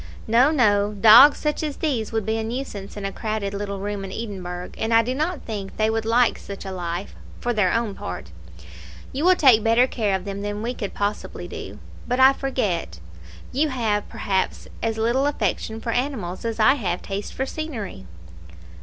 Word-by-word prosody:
"No, 240 +5 +5
no; 210 -8 +3
dogs 225 +8 +8
such 300 -1 -1
as 300 -3 -3
these 255 -9 -1
would 220 -3 -1
be 220 +1 0
a - - -2
nuisance 220 -4 -5
in 200 - -4
a 195 - -2
crowded 215 -2 -3
little 200 0 -4
room 200 0 -4
in 195 - -6
Edinburgh, 185 -5 -6
and 225 - -2
I 230 - +6
do 250 +3 -2
not 310 +4 -2
think 200 -4 -6
they 215 0 +2
would 225 0 -1
like 235 +1 +3
such 200 0 -8
a 190 - -5
life, 175 +1 -4 0.3
for 240 - -1
their 210 -5 +2
own 230 -3 0
part. 90 - -7 0.8
You 280 - -3
will 370 0 +6
take 255 -10 +5
better 230 +2 +5
care 215 -6 0
of 190 0 -4
them 200 0 -5
than 205 +1 -4
we 240 +2 -2
could 205 -5 -5
possibly 205 +1 -3
do. - - -8 0.3
But 250 +1 0
I 265 +1 +8
forget: 205 - -2 0.5
you 295 +4 +1
have, 220 -6 -1
perhaps, 190 -1 -2
as 225 -1 -1
little 240 +5 +2
affection 220 -4 -2
for 230 +1 -3
animals 230 -8 -2
as 230 0 -3
I 215 +5 +6
have 180 -3 -2
taste 200 +1 -4
for 265 - -1
scenery." 245 - -6
220 Hz, 195 wpm, -23 LUFS, 200-250 Hz, 0.8 s, dogs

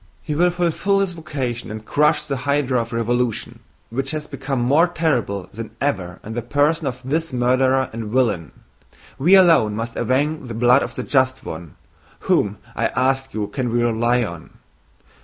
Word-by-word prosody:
He 150 - -3
will 175 +4 +3
fulfill 175 +3 +1
his 195 -2 0
vocation 135 -9 -4
and 110 0 -7
crush 150 +4 +2
the 140 -2 -2
hydra 135 -2 +1
of 115 - -7
revolution, 120 0 -1 0.3
which 135 +3 -2
has 155 0 -3
become 135 -2 -3
more 145 +8 +4
terrible 125 - -1
than 110 +1 -8
ever 95 -11 -2
in 110 - -7
the 120 - -2
person 145 +5 +1
of 125 0 -5
this 160 +3 -1
murderer 130 +1 +2
and 115 0 -5
villain! 105 - 0 0.7
We 175 +8 +6
alone 165 - +5
must 115 +1 -4
avenge 145 +2 0
the 115 - -6
blood 125 +4 +5
of - - -4
the - - -3
just 130 -1 +1
one.... 80 -1 -7 0.5
Whom, - - +1 0.2
I - - +1
ask 135 +1 0
you, 105 -1 -1
can 125 +2 -3
we 120 0 +1
rely 120 +1 +2
on?... 85 -6 -8
130 Hz, 175 wpm, -21 LUFS, 115-145 Hz, 0.7 s, We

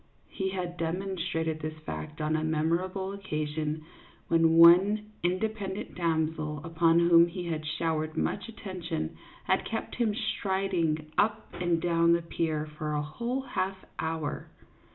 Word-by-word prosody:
He 190 0 -2
had 180 -2 -4
demonstrated 170 -2 -2
this 155 0 -5
fact 80 - -6
on 155 +1 +1
a 155 - 0
memorable 170 +5 0
occasion 155 -4 -3 0.4
when 165 -1 +4
one 190 +6 +7
independent 195 +2 -2
damsel 160 -3 -1
upon 165 0 +3
whom 170 0 +6
he 175 +1 -5
had 160 -2 -2
showered 155 0 -1
much - - -1
attention 180 - -4 0.3
had - - +1
kept 225 - -4
him 225 -4 0
striding 190 -8 -1
up 215 +1 +1
and 175 -2 0
down 170 0 +3
the 170 0 +1
pier 160 -2 -1
for 150 0 -4
a 150 0 0
whole 235 - -3
half 190 -7 -3
hour. 160 -2 -3
170 Hz, 135 wpm, -29 LUFS, 155-190 Hz, 0.4 s, one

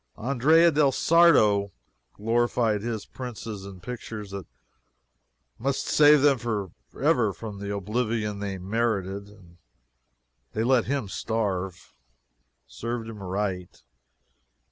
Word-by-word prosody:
Andrea 145 +8 +4
del 145 -2 +3
Sarto 120 - +4 0.4
glorified 115 -1 +1
his 110 -2 -4
princes 110 -5 -7
in 95 -2 -11
pictures 110 -3 -7
that 100 -4 -7 1.1
must 135 +3 -1
save 150 -1 +6
them 140 -3 +4
for 105 -6 -3 0.3
ever 125 -8 +3
from 105 +1 -8
the 100 0 -4
oblivion 105 +1 -2
they 100 -1 -4
merited, 100 -1 -2
and 90 -4 -18 1.0
they 110 - 0
let 125 -1 +3
him 135 -5 -2
starve. 95 -4 -3 0.7
Served 115 - -5
him 105 -3 -9
right. 95 -1 -4
110 Hz, 110 wpm, -26 LUFS, 100-125 Hz, 1.1 s, save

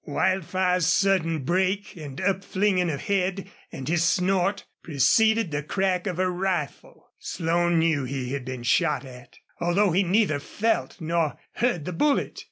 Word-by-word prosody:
Wildfire's 185 +2 0
sudden 170 -4 +2
break 190 +6 0
and 145 -5 -9
upflinging 190 -1 0
of 140 - -4
head 195 -1 -1 0.2
and 135 -5 -7
his 165 +1 +1
snort 185 +3 +1 0.2
preceded 215 - +2
the 145 0 -1
crack 185 +4 -1
of 180 -3 -3
a 185 0 +1
rifle. 180 -4 -4
Slone 170 +1 0
knew 160 -4 +2
he 130 -1 -4
had 140 -2 -3
been 130 -1 -6
shot 150 +4 +1
at, 125 -2 -13 0.2
although 175 +3 +2
he 185 +4 +3
neither 190 -5 +2
felt 220 +7 -2
nor 165 -2 -1
heard 225 -11 -1
the 180 - -4
bullet. 285 - 0
175 Hz, 150 wpm, -25 LUFS, 155-195 Hz, 0.2 s, he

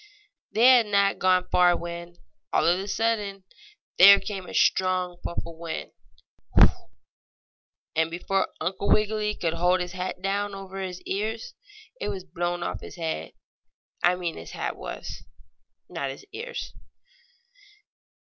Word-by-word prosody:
They 225 +3 +3
had 250 -3 +7
not 200 -1 +2
gone 185 -1 +3
far 175 -1 +5
when, 170 0 -7 0.4
all - - +2
of 175 +2 +3
a 195 - -5
sudden, 205 -2 -1 0.6
there 200 +2 +10
came 195 -3 -6
a - - -9
strong 185 -1 +2
puff 170 - -5
of 170 -1 -9
wind, 165 -1 -5 2.0
and, 160 0 +2
before 185 +3 0
Uncle 190 +2 -2
Wiggily 210 0 +2
could 165 -2 -1
hold 180 +2 +2
his 180 -1 -3
hat 185 0 -4
down 200 +1 -1
over 195 0 -7
his 185 -1 -5
ears, 220 - -3 0.5
it - - -2
was 190 -2 -5
blown 175 -1 -3
off - - -4
his - - -10
head. 160 - -4 0.7
I 175 +1 +4
mean 175 -2 -4
his - - -9
hat - - -3
was - - -7 0.6
not 140 - -4
his 135 - -9
ears. 470 +3 -6
185 Hz, 140 wpm, -26 LUFS, 175-200 Hz, 2.0 s, there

